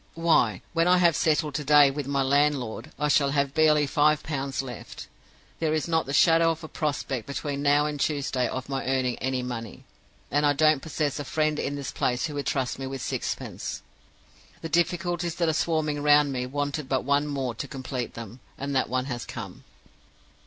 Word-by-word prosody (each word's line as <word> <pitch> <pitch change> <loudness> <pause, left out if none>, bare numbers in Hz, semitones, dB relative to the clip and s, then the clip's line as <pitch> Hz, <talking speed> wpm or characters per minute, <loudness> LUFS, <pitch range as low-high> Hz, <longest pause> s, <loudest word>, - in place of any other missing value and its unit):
Why, 165 0 +2
when 165 0 +2
I 180 0 +5
have 170 -3 +4
settled 155 -1 +1
to 150 - -2
day 145 -1 +6
with 140 -1 -5
my 140 -1 +1
landlord, 140 -4 0
I 150 - 0
shall 140 -1 +3
have 140 -1 0
barely 155 -1 +4
five 150 +1 +2
pounds 135 -3 -3
left! 125 -3 -8 0.5
There 155 -1 +1
is 155 - -1
not 160 -3 0
the - - -4
shadow 165 +2 +5
of 165 0 -3
a - - -6
prospect 140 -7 -3
between 140 0 -3
now 145 +1 +3
and 150 -1 -3
Tuesday 135 -4 0
of 130 0 -5
my 135 -1 -3
earning 130 -2 0
any 130 0 -1
money; 120 -3 -6 0.5
and 145 +1 +2
I 145 -1 +4
don't 155 0 +4
possess 150 -2 -2
a - - -3
friend 155 +1 0
in 140 - -2
this 140 -2 -5
place 125 -1 0
who 155 - -4
would 145 -1 -4
trust 130 -2 -1
me 135 - -4
with 135 -1 -5
sixpence. - - -4 0.8
The 165 - -5
difficulties 175 0 0
that 170 - 0
are - - +1
swarming 155 -2 0
round 145 -1 +5
me 125 -1 -2
wanted 145 +1 -3
but 130 -2 0
one 140 +2 +1
more 135 -4 -2
to - - -6
complete 130 -3 -5
them, 115 +1 -9 0.2
and 140 0 -4
that 130 - +1
one 130 +1 -1
has 120 -3 -4
come. - - -8
145 Hz, 200 wpm, -26 LUFS, 135-155 Hz, 0.8 s, day